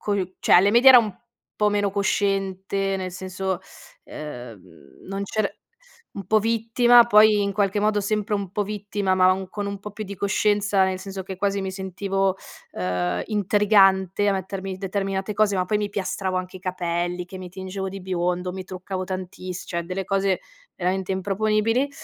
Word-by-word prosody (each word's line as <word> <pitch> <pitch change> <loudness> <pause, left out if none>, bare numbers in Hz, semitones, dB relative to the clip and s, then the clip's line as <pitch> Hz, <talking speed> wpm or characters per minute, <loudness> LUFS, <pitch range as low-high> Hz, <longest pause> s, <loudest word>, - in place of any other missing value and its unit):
co 185 -2 -2
cioè, - - +3
alle 195 +3 +6
medie 240 +4 +7
era 260 - +11
un 215 -4 -2 0.4
po' 210 - +2
meno 205 -1 0
cosciente, 195 -1 0
nel 185 -1 -4
senso, 185 0 -4 0.5
uhm, 120 -8 -8 0.5
non 195 +1 -3
c'er 210 +1 -3 0.5
un 195 - -7
po' 220 - +4
vittima, 230 +2 +4
poi 215 -2 +6
in 200 0 0
qualche 200 0 +1
modo 210 0 +2
sempre 210 +1 -1
un 200 -3 -4
po' 205 - -1
vittima, 205 -1 -2
ma 185 +1 +3
con 205 +1 -4
un 200 0 -4
po' 210 - -7
più 215 +2 -6
di 200 -1 -7
coscienza, 205 0 +2
nel 190 0 -1
senso 195 0 -6
che 190 0 -7
quasi 200 +1 0
mi 190 -1 -3
sentivo, 195 0 -1 0.4
ehm, 90 -1 -1
intrigante 200 -1 +3
a - - +4
mettermi 190 0 -4
determinate 195 +1 -2
cose. 205 -1 +2
Ma 185 -1 0
poi 210 +3 +1
mi 210 -1 -2
piastravo 190 -1 -2
anche 185 0 -5
i - - -16
capelli, 175 -1 -2
che 185 +1 -9
mi 185 -1 -8
tingevo 190 +1 -5
di 195 +1 -7
biondo, 180 -1 -2
mi 190 0 -6
truccavo 185 0 -5
tantiss 185 -1 -6
cioè, 170 - -3
delle 185 +2 -4
cose 195 -1 +1 0.4
veramente 185 +1 -1
improponibili. 215 +6 +1
195 Hz, 175 wpm, -24 LUFS, 185-205 Hz, 0.5 s, era